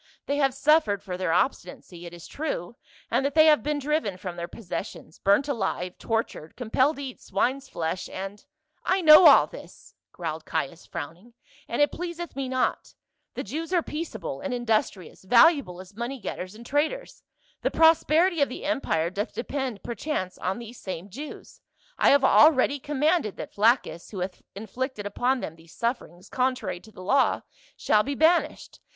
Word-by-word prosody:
" - - -40
They 285 - -1
have 270 -3 +2
suffered 295 -9 +3
for 185 -3 -5
their 180 -2 -1
obstinacy, 175 -3 -2
it - - -10
is 170 - -12
true, 240 - -4 0.4
in - - +2
that 280 +1 -2
they 315 -1 +7
have 305 -1 +5
been 300 0 -1
driven 285 - -1
from 180 -2 -6
their 170 0 -5
possessions, 175 -4 -7
burnt 200 +9 +3
alive, 190 -8 -3
tortured, 225 -8 -3
compelled 260 +5 +1
to 280 - -7
eat 260 -2 -8
swine's 265 +7 -1
flesh, 165 +2 -3
and 195 +2 -7
— 310 0 -53
" - - -49
"I 370 +1 +1
know 310 +1 +9
all - - +8
this," - - -13 0.2
growled 160 -2 -5
Caius 170 +1 -4
frowning, 180 +11 -8 0.3
"and 240 +5 +2
it 290 - +1
pleaseth 345 -2 -6
me 270 -1 -3
not: 255 -1 -1 0.4
the - - -3
Jews 325 +3 -5
are 350 -3 +2
peaceable 320 -1 -5
and 280 -3 -3
indus 225 -3 +1
trious, 185 -3 -14
valuable 240 - +4
as 190 +2 -12
money 240 +4 -4
getters 185 -1 -6
and 235 +2 -12
traders; 305 - -2 0.4
the - - +1
prosperity 325 +1 +4
of 280 - +3
the 255 - -7
empire 175 - 0
doth 205 +4 -4
depend, 255 -4 -4
perchance, 230 -5 -3
on 185 +1 -2
these 235 0 -10
same 185 0 -7
Jews. 295 +9 -9 0.4
I - - +5
have 280 -1 +5
already 285 0 +5
commanded 295 - 0
that - - -7
Flaccus, 215 -5 +1
who 195 -4 -6
hath 180 0 -5
inflicted 220 +2 -5
upon 245 +5 0
them 160 - -6
these 165 0 -18
sufferings 205 -6 -4
contrary 255 -7 -1
to 220 +4 -17
the 185 - -11
law, 265 +8 +2 0.3
shall 210 - +3
be 280 +6 -3
banished. 325 +4 +1
245 Hz, 180 wpm, -26 LUFS, 185-290 Hz, 0.4 s, know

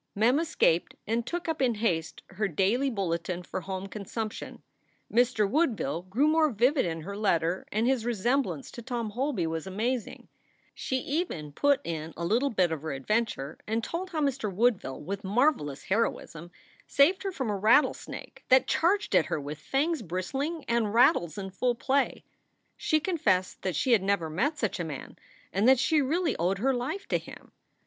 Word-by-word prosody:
Mem 235 +7 +3
escaped 315 - +1
and 230 +2 -1
took 350 0 -3
up 320 -2 -2
in 245 -3 +2
haste 175 -7 -1
her 205 +2 -1
daily 200 - +1
bulletin 180 -4 -2
for 185 - -5
home 190 +1 -5
consumption. 215 +2 -6 0.5
Mr. 235 -3 +3
Woodville 210 - 0
grew 210 +11 +1
more 310 0 +4
vivid 250 - +2
in 165 -1 -3
her 200 +5 -6
letter 180 -4 0
and 220 +2 +1
his 255 -2 +2
resemblance 235 - -1
to 235 - -8
Tom 235 -3 -3
Holby 245 - -1
was 160 +1 -3
amazing. 225 +4 -3 0.5
She 260 - -2
even 275 - -3
put 285 - +2
in 160 -1 -5
a 170 - -3
little 240 +10 +2
bit 185 -7 +2
of 160 -3 -3
her 155 -2 -4
adventure 155 - -2
and 225 +1 -1
told 360 +8 -4
how 320 -3 -2
Mr. 270 -7 0
Woodville 200 - +1
with 195 +5 -5
marvelous 200 - +1
heroism 185 -5 -2 0.4
saved 325 +7 +4
her 390 - -2
from 260 - -2
a - - -1
rattle 220 +9 +5
snake - - -10
that 260 0 +6
charged 395 +5 +1
at - - +4
her - - -1
with 145 +2 -6
fangs 290 - 0
bristling 270 - -3
and 230 -2 +1
rattles 170 -9 +4
in 195 -1 -5
full 245 +6 0
play. 275 +4 0 0.5
She 310 - +1
confessed 230 - 0
that 185 -4 -2
she 255 - +1
had 225 -5 +5
never 190 -5 0
met 285 - 0
such - - -2
a - - -1
man - - -7 0.4
and 205 +4 +2
that 265 0 +7
she 300 +4 +3
really 320 +3 0
owed 180 +4 +1
her 265 +7 +1
life 260 +11 -3
to - - +2
him. - - -13
225 Hz, 180 wpm, -28 LUFS, 185-270 Hz, 0.5 s, that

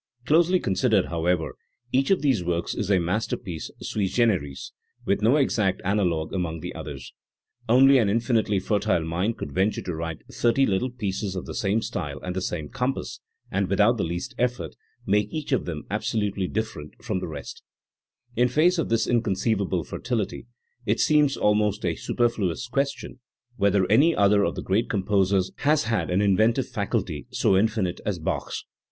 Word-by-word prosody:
Closely 170 +4 +4
considered, 100 - +1
however, 85 0 0 0.4
each 135 +1 +2
of 190 -5 +2
these 130 -10 +2
works 85 0 -1
is 105 -4 -3
a 100 - +4
masterpiece 90 -1 -3
sui 100 -3 -1
generis, 95 - 0 0.3
with 100 +1 +1
no 115 +6 +4
exact 105 -9 +1
analogue 90 -6 0
among 85 -4 -2
the 90 - -6
others. 75 -6 -8 0.6
Only 135 +3 +6
an 110 -4 +2
infinitely 115 -1 +1
fertile 100 -3 0
mind 90 +8 -1
could 70 - -6
venture 95 +7 0
to 90 - -4
write 80 0 -5
thirty 120 +2 +2
little 105 +5 0
pieces 100 -5 -3
of 90 - -4
the - - -7
same 105 +2 0
style 75 -6 -4
and 90 0 -4
the 95 - -1
same 80 -4 -3
compass, 125 - -3 0.3
and, 95 0 0
without 105 +5 +3
the - - 0
least 90 +10 -4
effort, 120 -10 -1 0.3
make 105 +1 +1
each 155 -2 -5
of 130 - +1
them 80 -4 -5
absolutely 105 -3 -1
different 110 -9 -4
from 110 -6 -1
the 90 - -5
rest, 75 -3 -8 0.7
In 125 +2 +3
face 165 +8 +3
of 165 - -1
this 115 0 +2
inconceivable 100 -5 0
fertility 115 -1 -3 0.4
it 110 0 0
seems 150 -2 +3
almost 105 -1 +1
a 85 - +1
superfluous 115 -7 -1
question 140 0 -2 0.4
whether 100 -1 +3
any 140 - +4
other 100 0 +4
of - - -2
the - - -5
great 100 +5 0
composers 95 -2 +1
has 150 +1 +2
had 110 -1 -1
an 90 +3 +2
inventive 110 +6 +3
faculty 100 - -3
so 95 - +2
infinite 100 -3 0
as 105 -3 -2
Bach's. 80 - -3
105 Hz, 170 wpm, -25 LUFS, 90-120 Hz, 0.7 s, Only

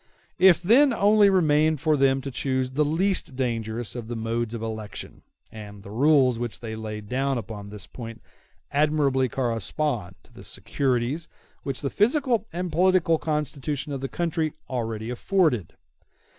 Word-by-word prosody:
It 185 -1 +8
then 255 +8 +5
only 205 -1 +5
remained 155 -4 +3
for 155 +1 +2
them 135 -1 +3
to 135 +1 -6
choose 130 0 -1
the 150 +3 +2
least 165 -1 0
dangerous 115 -2 -3
of 120 -3 -6
the 120 - -4
various 110 - -5
modes 115 -1 -1
of 115 - -5
election; 110 -3 -6 0.3
and 105 -2 -10
the 100 - -10
rules 130 0 +4
which 120 -2 -4
they 110 -2 -6
laid 105 -1 -6
down 135 +3 0
upon 105 -2 -7
this 105 -2 -8
point 115 +2 -9 0.5
admirably 140 -3 +2
correspond 115 -3 -2
to - - -24
the - - -12
securities 135 +4 -2 0.3
which 135 -2 -4
the 140 - -2
physical 240 0 +2
and 175 +1 -3
political 175 -1 +3
constitution 150 -1 -2
of 135 - -4
the 135 - -3
country 165 -2 -1
already 115 -3 -3
afforded. 125 - +1
135 Hz, 155 wpm, -25 LUFS, 115-155 Hz, 0.5 s, It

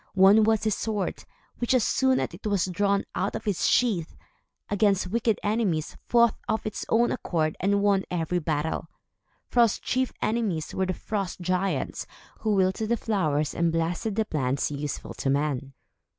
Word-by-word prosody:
One 195 +3 +7
was 220 -1 +2
his 215 -1 +2
sword, 210 -2 -3 0.3
which, 240 +2 +2
as 250 - +3
soon 260 +2 +2
as - - -1
it 185 +5 -6
was 200 -4 +1
drawn 200 +2 +1
out - - -1
of - - -6
its 200 -4 +1
sheath, 200 -10 +1 0.5
against 205 -2 +2
wicked 225 -1 +1
enemies, 205 -8 0
fought 235 -2 +4 0.2
of 220 0 0
its 215 - -4
own 235 +1 +3
accord 155 -9 -1
and 200 +1 +1
won 200 -2 +3
every 175 0 -1
battle. 160 0 -2 0.6
Fro's 235 -3 +3
chief 260 0 -1
enemies 215 -8 -1
were 190 0 0
the 185 - -1
frost 200 -5 -4
giants, 185 +2 -1 0.3
who 215 -2 +1
wilted 190 +3 +1
the 235 - +2
flowers 155 -10 0
and 170 -1 +1
blasted 170 +6 -1
the 220 0 +1
plants 140 -5 -1
useful 145 0 -4
to 135 - -2
man. 140 -1 0
195 Hz, 165 wpm, -26 LUFS, 165-220 Hz, 0.6 s, One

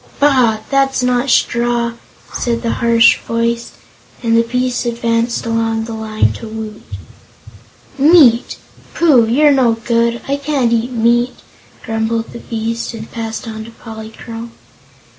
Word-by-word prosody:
"Bah! 255 -7 +3
that's 270 -1 +2
not 250 +1 +1
straw," 235 -1 +1 0.4
said 235 -1 -2
the 230 - 0
harsh 230 -1 +5
voice, 230 0 -2 0.5
and 230 -1 +2
the 230 - +5
beast 250 +2 -1
advanced 235 0 -1
along 225 -1 -1
the 225 0 -6
line 220 -1 0
to 230 - -9
Woot. 215 -1 -7 1.2
"Meat! 275 -6 +5 0.4
Pooh, 275 -9 +4
you're 290 +6 +4
no 255 -4 +3
good! 235 +1 0
I 280 +1 0
can't 280 -5 0
eat 235 +1 0
meat," 240 +1 +1 0.5
grumbled 225 0 -2
the - - -8
beast, 230 +1 -4
and 220 0 -9
passed 225 -1 -5
on 220 -1 -6
to - - -11
Polychrome. 225 +1 -9
235 Hz, 135 wpm, -16 LUFS, 225-245 Hz, 1.2 s, harsh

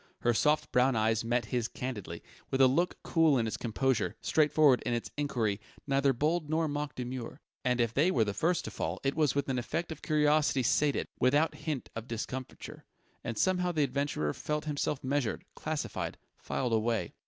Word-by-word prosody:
Her 120 - +3
soft 150 +6 +2
brown 125 +1 +3
eyes 110 0 +2
met 120 0 0
his 120 -2 +1
candidly, 125 -7 -6 0.3
with 135 - -1
a 135 - +8
look 170 +8 +1
cool 160 -4 +3
in 115 - +1
its 110 - -2
composure, 120 0 0
straightforward 150 -3 +4
in 120 - 0
its 120 - -4
enquiry, 115 -8 -1 0.2
neither 140 0 +3
bold 150 +4 0
nor 160 +1 +1
mock 145 0 -3
demure. 125 +1 -5 0.2
And 125 -1 +1
if 115 -1 +1
they 150 +8 +3
were 120 -11 +3
the 105 -2 -2
first 165 - 0
to - - -5
fall, - - -3
it 135 0 +1
was 150 -3 +1
with 140 -1 0
an 130 -2 0
effect 165 +8 -3
of 160 - -7
curiosity 150 -2 +2
sated, 145 +4 +2
without 145 +5 +3
hint 150 -6 -4
of 115 +1 -6
discomfiture.... 125 +3 -6 0.4
And 115 -2 -4
somehow 180 - +2
the 155 -3 +1
adventurer 135 - -1
felt 150 0 -3
himself 145 -2 -2
measured, 130 -3 -1
classified, 155 -1 -4 0.2
filed 125 -3 -2
away. 110 -4 0
135 Hz, 185 wpm, -31 LUFS, 120-150 Hz, 0.4 s, a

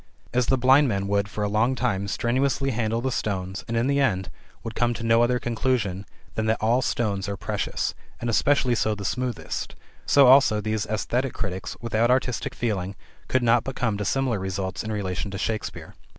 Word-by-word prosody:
As 125 -1 +2
the 135 - +3
blind 135 +3 +5
man 100 -4 -1
would 100 0 +1
for 105 +1 -3
a - - +1
long 110 +5 +2
time 105 -6 -1
strenuously 135 +5 0
handle 115 -1 -1
the 130 +1 -1
stones 95 -3 -3
and 115 - -1
in 115 - +2
the 140 +1 +2
end 95 -9 0 0.3
would 115 -1 -5
come 120 +1 +1
to 115 - -6
no 115 0 +4
other 125 +1 +3
conclusion 110 -5 -1 0.3
than 110 0 -1
that 110 - +2
all 115 +4 +2
stones 100 -6 -1
are 100 - -3
precious - - -2 0.3
and 120 - -4
especially 125 +3 +3
so 110 -2 +1
the 100 -1 -7
smoothest, 125 +5 -3 0.3
so 140 -1 +6
also 130 -4 +6
these 110 0 -2
esthetic 120 +5 -1
critics, 95 -3 -4
without 115 0 +1
artistic 125 -1 0
feeling, 100 -5 -2 0.3
could 130 -1 +1
not 115 0 +4
but 135 - -5
come 110 -5 0
to - - -1
similar 125 0 0
results 95 0 -3
in 110 - -4
relation 100 -1 -3
to 95 - -5
Shakespeare. 110 +2 -4
115 Hz, 195 wpm, -25 LUFS, 100-125 Hz, 0.3 s, so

